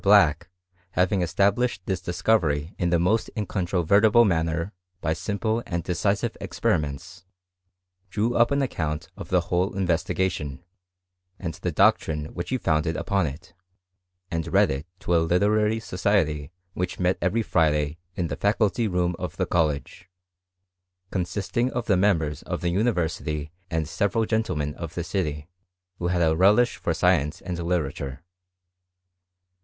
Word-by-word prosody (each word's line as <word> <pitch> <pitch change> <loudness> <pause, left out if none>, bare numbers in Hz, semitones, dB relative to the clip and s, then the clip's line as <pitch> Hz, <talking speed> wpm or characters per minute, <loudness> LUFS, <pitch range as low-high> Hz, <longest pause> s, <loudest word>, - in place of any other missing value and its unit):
Black, 100 -8 +5 0.4
having 90 +1 +2
established 100 +4 +1
this 95 -3 -2
discovery 85 -5 +1
in 90 - +1
the 85 - +3
most 90 +7 +1
incontrovertible 100 +3 +3
manner 85 0 0 0.3
by 80 - 0
simple 110 +5 -1
and 85 -2 -2
decisive 100 +4 0
experiments, 80 +5 -2 0.9
drew 110 +5 0
up 120 0 +5
an 140 0 +1
account 80 - -3
of - - -9
the - - +3
whole 90 +2 -1
investigation, 85 -4 -1 0.7
and 85 -3 -4
the - - -3
doctrine 75 -1 +2
which 85 0 -5
he 130 - +1
founded 80 -5 0
upon 100 -4 0
it, 85 +5 -9 0.8
and 80 0 -2
read - - +4
it 70 +4 -4
to 90 - -1
a 85 - +4
literary 105 +6 +2
society 90 -8 0 0.2
which 90 -1 -3
met 90 0 +1
every 105 +6 +1
Friday 75 -4 +1 0.2
in 90 - -1
the - - -3
faculty 105 +1 +1
room 90 -2 0
of - - -5
the - - +1
college, 80 +2 -1 1.0
con 90 -3 0
sisting 105 +7 -1
of 125 -2 -3
the 100 - +3
members 85 -6 +1
of - - -4
the 85 - 0
university 85 -7 -1 0.2
and 80 -2 -1
several 105 +7 0
gentlemen 90 -11 -1
of 85 0 -7
the 85 - -2
city, 80 -5 -2 0.5
who 85 - -1
had 90 -1 +1
a 80 -1 +3
relish 105 +8 +4
for - - -1
science 80 -3 +2
and 90 -1 -4
literature. 75 -5 -2
90 Hz, 145 wpm, -25 LUFS, 80-100 Hz, 1.0 s, Black